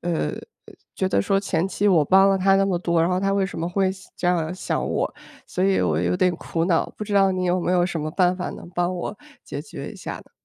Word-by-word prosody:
呃， 170 -2 -1 0.6
觉 190 - 0
得 - - +2
说 195 -1 +1
前 190 -2 -1
期 200 +2 -1
我 180 -6 +5
帮 195 +5 +5
了 195 - +2
她 195 +1 +4
那 195 - +3
么 190 -3 0
多， 170 -1 0
然 170 - +1
后 180 0 +1
她 195 0 +1
为 195 -1 +2
什 190 - -5
么 165 +1 -2
会 190 +1 +1
西 190 -1 -14
这 - - -2
样 175 -1 +1
想 185 - -2
我？ - - -1 0.3
所 180 - -3
以 195 0 +3
我 80 -3 +1
有 90 +1 +1
点 180 -1 +2
苦 165 0 -2
恼， 170 -2 +1
不 210 - -5
知 210 - -6
道 195 -1 +5
你 185 -1 -1
有 180 +1 +1
没 175 - 0
有 180 -1 +3
什 175 -2 -2
么 155 +1 -3
办 180 +2 +2
法 180 - -3
能 175 - -10
帮 175 0 0
我 180 +4 -5 0.3
解 - - -5
决 - - -8
一 - - -11
下 - - -6
呢？ - - -15
180 Hz, 295 characters per minute, -23 LUFS, 170-195 Hz, 0.6 s, 我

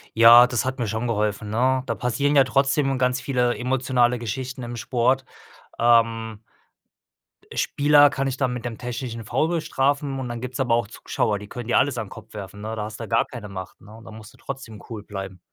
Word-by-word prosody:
Ja, 115 +2 +9
das 120 0 -1
hat 130 0 -3
mir 115 - -1
schon 110 +3 -2
geholfen, 105 -1 -1
ne? 130 +4 +1
Da - - -1
passieren 140 +4 0
ja 135 - +7
trotzdem 135 +1 +1
ganz 125 0 +1
viele 125 -3 +1
emotionale 125 -1 +1
Geschichten 125 +3 -5
im 120 0 -6
Sport. 125 +3 0 0.5
Ähm 115 -2 +2 1.1
äh, - - -9
Spieler 145 0 +5
kann 135 0 -2
ich 130 -1 -3
dann 130 -3 0
mit 125 -1 -6
dem 115 -2 -4
technischen 120 -1 -5
Foul 130 +8 +1
bestrafen 140 -4 0
und 130 -2 -4
dann 120 -1 -5
gibt's 125 +1 -6
aber 120 -3 +2
auch 115 -3 0
Zuschauer, 105 0 -2
die 105 - -10
könnt 120 +2 -7
ihr - - +3
alles 135 -2 +2
an 110 -3 -4
Kopf - - -13
werfen, 105 -1 -8
ne? 110 +1 -4
Da 105 - -3
hast 110 +2 -7
du 115 - -6
gar - - +2
keine 110 -5 -9
Macht, 95 -1 -8
ne? 105 +2 -14
Und 115 - -14
da - - -10
musst 110 0 -12
du - - -20
trotzdem 130 -6 -8
cool 110 -3 -7
bleiben. 95 -3 -7
120 Hz, 215 wpm, -23 LUFS, 110-130 Hz, 1.1 s, Ja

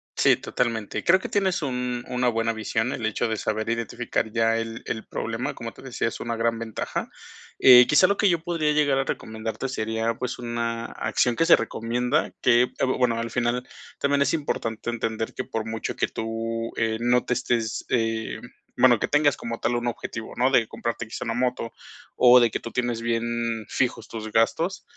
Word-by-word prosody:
Sí, - - +5
totalmente. 115 -4 -2
Creo 185 +2 +5
que - - -5
tienes 190 -5 0
un 125 -2 -2
una 125 0 0
buena 115 0 0
visión, 110 +2 -1
el 115 - -5
hecho 110 +2 0
de 110 - -1
saber 110 +1 -2
identificar 115 -1 -2
ya 115 0 +2
el 115 +1 -5
el 110 - -4
problema, - - -3
como - - -7
te - - -15
decía, - - -2
es - - -5
una 115 -1 -3
gran 115 0 0
ventaja. 115 -2 -4 0.5
Eh, 125 -1 +9
quizás 155 +4 +6
lo 200 - +3
que 205 - +4
yo 170 - +2
podría 165 -2 0
llegar 145 -2 +3
a 135 - 0
recomendarte 110 +4 -4
sería, 110 -2 -1
pues, 125 +1 -4
una 115 -1 -3
acción 115 +2 0
que 165 - +2
se - - +8
recomienda 125 +6 -1
que, 120 -1 +5
eh, 125 - -1
bueno, 125 -3 +1
al 115 0 -4
final 120 +1 -1 0.3
también 140 0 +2
es 140 - +2
importante 120 -8 -2
entender 115 -1 -3
que 130 - -4
por 110 -1 -3
mucho 110 0 -4
que - - 0
tú, 115 +1 -4
eh, 110 -1 0
no 120 +1 +2
te - - +1
estés, 120 -3 -1
eh, 115 -2 -1 0.4
bueno, 120 -4 +6
que - - 0
tengas 145 -1 +3
como 115 0 -5
tal 120 +2 0
un 120 0 -2
objetivo, 115 -1 -5
¿no? 125 +2 +3
De 115 -4 +4
comprarte 115 0 -4
quizás 110 - -7
una 115 - -1
moto 125 -2 -1 0.4
o 125 0 +7
de 120 -2 +4
que - - -2
tú 115 - -8
tienes 120 -1 -1
bien 115 -1 -1
fijos 120 -3 -1
tus 110 -1 -7
gastos, 165 - +1
115 Hz, 195 wpm, -25 LUFS, 115-125 Hz, 0.5 s, Eh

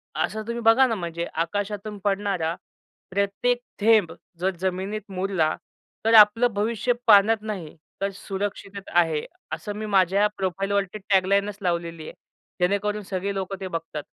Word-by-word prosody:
असं 220 - -1
तुम्ही 235 0 -3
बघा 225 +4 +6
ना, 230 - -1
म्हणजे 170 -3 -4
आकाशातून 205 +5 -3
पडणारा 195 -5 0 0.6
प्रत्येक 200 +5 0 0.2
थेंब 215 -5 +4 0.3
जर 185 +1 0
जमिनीत 190 +3 -2
मुरला, 185 -4 0 0.5
तर 225 - +3
आपलं 220 +2 +7
भविष्य 225 +4 0
पाण्यात 210 +1 +6
नाही 200 -8 -6 0.3
तर 195 - +1
सुरक्षिततेत 200 0 -5
आहे. 165 -3 +2 0.3
असं 205 -1 -5
मी 215 +1 -4
माझ्या 195 0 +3
प्रोफाइलवरती 195 +1 -1
टॅगलाईनचं 200 +1 +2
लावलेली 170 -2 -2
आहे, - - -8 0.5
जेणेकरून 200 +3 +1
सगळे 195 +1 -3
लोकं 195 0 -4
ते 190 - -3
बघतात. 165 -4 -5
200 Hz, 135 wpm, -24 LUFS, 185-210 Hz, 0.6 s, आपलं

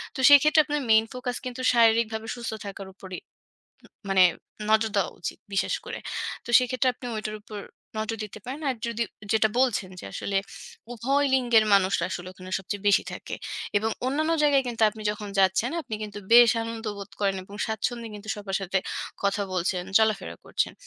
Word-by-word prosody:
তো - - -6
সেক্ষেত্রে 295 +2 +7
আপনার 295 0 -1
main 220 0 +6
focus 250 -1 -4
কিন্তু 255 0 -5
শারীরিকভাবে 225 -1 +3
সুস্থ 235 -2 -5
থাকার 195 -1 -7
উপরই 185 -2 -8 0.7
উ - - -14 0.2
মানে 190 -1 +5 0.5
নজর 220 0 +3
দেওয়া 200 - +1
উচিত - - -5
বিশেষ 195 - +1
করে। - - -6 0.5
তো - - -13
সেক্ষেত্রে 255 +1 +1
আপনি 250 - -9
ওইটার 215 0 -4
উপর 210 -1 -8 0.4
নজর 220 +1 -2
দিতে 210 0 -9
পারেন। 275 +5 -6
আর 255 - -3
যদি, 235 0 -1 0.3
যেটা 220 0 +4
বলছেন 240 -7 +1
যে - - -11
আসলে 200 - -3 0.6
উভয় 275 +5 +1
লিঙ্গের 240 -4 +4
মানুষরা 195 0 +3
আসলে 180 0 -5
ওখানে 185 0 -11
সবচেয়ে 195 +1 -5
বেশি 200 - +5
থাকে - - -6 0.4
এবং 220 +2 -1 0.2
অন্যান্য 310 +5 +1
জায়গায় 280 -2 +4
কিন্তু 230 -2 -3
আপনি 215 0 -10
যখন 210 0 -6
যাচ্ছেন 190 +6 +3
আপনি 245 -6 -6
কিন্তু 210 -1 -6
বেশ 240 -1 +9
আনন্দবোধ 220 -3 -5
করেন 195 -1 +1
এবং 200 +2 -13
স্বাচ্ছন্দ্যে 230 +1 -3
কিন্তু 210 +1 -10
সবার 200 -2 -3
সাথে 195 0 0 0.4
কথা 200 +1 +1
বলছেন, 180 0 0 0.2
চলাফেরা 215 -3 0
করছেন। - - -1
220 Hz, 175 wpm, -26 LUFS, 200-245 Hz, 0.7 s, বেশ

